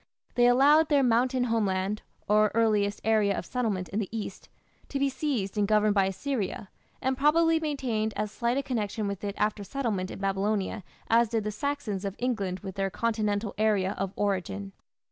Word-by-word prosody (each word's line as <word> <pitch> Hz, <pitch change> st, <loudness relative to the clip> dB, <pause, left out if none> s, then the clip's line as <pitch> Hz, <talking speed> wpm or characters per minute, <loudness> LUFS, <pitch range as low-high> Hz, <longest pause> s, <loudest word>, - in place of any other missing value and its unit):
They 245 Hz, 0 st, +4 dB
allowed 290 Hz, +6 st, +5 dB
their 285 Hz, -3 st, +4 dB
mountain 250 Hz, +1 st, +2 dB
homeland, 210 Hz, -3 st, 0 dB, 0.3 s
or 210 Hz, 0 st, +4 dB
earliest 210 Hz, -3 st, +2 dB
area 215 Hz, -2 st, +2 dB
of -, -, -4 dB
settlement 215 Hz, -8 st, -2 dB
in 200 Hz, -, -2 dB
the 205 Hz, -, -3 dB
east, 220 Hz, -2 st, -6 dB, 0.4 s
to 280 Hz, -, -2 dB
be 275 Hz, 0 st, +2 dB
seized 240 Hz, -9 st, -2 dB
and 205 Hz, -, +2 dB
governed 210 Hz, 0 st, +3 dB
by 195 Hz, -2 st, +3 dB
Assyria, 205 Hz, -1 st, -3 dB, 0.3 s
and 265 Hz, 0 st, +1 dB
probably 325 Hz, +4 st, +4 dB
maintained 250 Hz, -8 st, -1 dB
as 210 Hz, 0 st, -2 dB
slight 235 Hz, +3 st, 0 dB
a 275 Hz, -, 0 dB
connection 215 Hz, -4 st, -2 dB
with 200 Hz, -1 st, -5 dB
it 200 Hz, -1 st, -3 dB
after 210 Hz, -1 st, 0 dB
settlement 205 Hz, -6 st, -2 dB
in -, -, -7 dB
Babylonia 195 Hz, +1 st, -1 dB, 0.2 s
as 230 Hz, 0 st, +4 dB
did 225 Hz, -1 st, 0 dB
the 210 Hz, -, -2 dB
Saxons 220 Hz, -4 st, -3 dB
of 200 Hz, -1 st, -3 dB
England 200 Hz, -7 st, -2 dB
with 195 Hz, -1 st, -7 dB
their 195 Hz, 0 st, 0 dB
Continental 210 Hz, -1 st, -1 dB
area 205 Hz, -3 st, +2 dB
of 195 Hz, -1 st, -1 dB
origin. 175 Hz, -, -2 dB
215 Hz, 180 wpm, -28 LUFS, 200-245 Hz, 0.4 s, allowed